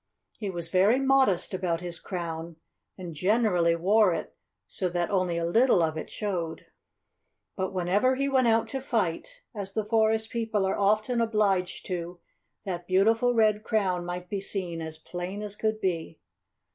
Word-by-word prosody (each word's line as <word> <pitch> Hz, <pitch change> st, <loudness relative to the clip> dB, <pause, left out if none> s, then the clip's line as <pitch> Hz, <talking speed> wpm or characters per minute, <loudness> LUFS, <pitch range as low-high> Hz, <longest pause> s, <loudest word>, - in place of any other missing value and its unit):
He 205 Hz, -, -3 dB
was 170 Hz, -3 st, -4 dB
very 195 Hz, +8 st, +4 dB
modest 265 Hz, -10 st, +3 dB
about 180 Hz, -3 st, -1 dB
his 175 Hz, -1 st, -5 dB
crown, 170 Hz, -2 st, -5 dB, 0.4 s
and 180 Hz, -3 st, -7 dB
generally 180 Hz, -1 st, +2 dB
wore 190 Hz, +2 st, +3 dB
it -, -, -6 dB, 0.3 s
so 185 Hz, -3 st, -2 dB
that 175 Hz, +1 st, -1 dB
only 185 Hz, -3 st, +1 dB
a 170 Hz, -, -1 dB
little 215 Hz, +1 st, +4 dB
of 160 Hz, -1 st, 0 dB
it 155 Hz, -, -5 dB
showed. 175 Hz, -6 st, -4 dB, 0.9 s
But 190 Hz, -1 st, -2 dB
whenever 195 Hz, +8 st, +2 dB
he 275 Hz, +1 st, 0 dB
went 260 Hz, -3 st, +3 dB
out 225 Hz, 0 st, +3 dB
to 270 Hz, -1 st, -3 dB
fight, 255 Hz, -, -2 dB
as 200 Hz, -3 st, -6 dB
the 220 Hz, 0 st, -1 dB
forest 220 Hz, 0 st, +2 dB
people 220 Hz, -4 st, 0 dB
are 190 Hz, -, 0 dB
often 215 Hz, +4 st, +1 dB
obliged 205 Hz, -5 st, 0 dB
to, 175 Hz, -1 st, -5 dB, 0.5 s
that 175 Hz, -2 st, -4 dB
beautiful 225 Hz, +6 st, +3 dB
red 215 Hz, -2 st, +3 dB
crown 190 Hz, -6 st, 0 dB
might 175 Hz, +1 st, -5 dB
be 200 Hz, -1 st, -3 dB
seen 180 Hz, -4 st, -3 dB
as 160 Hz, -1 st, -4 dB
plain 180 Hz, +5 st, -6 dB
as 205 Hz, -1 st, -6 dB
could 215 Hz, 0 st, -1 dB
be. 165 Hz, -4 st, -2 dB
195 Hz, 165 wpm, -27 LUFS, 175-220 Hz, 0.9 s, very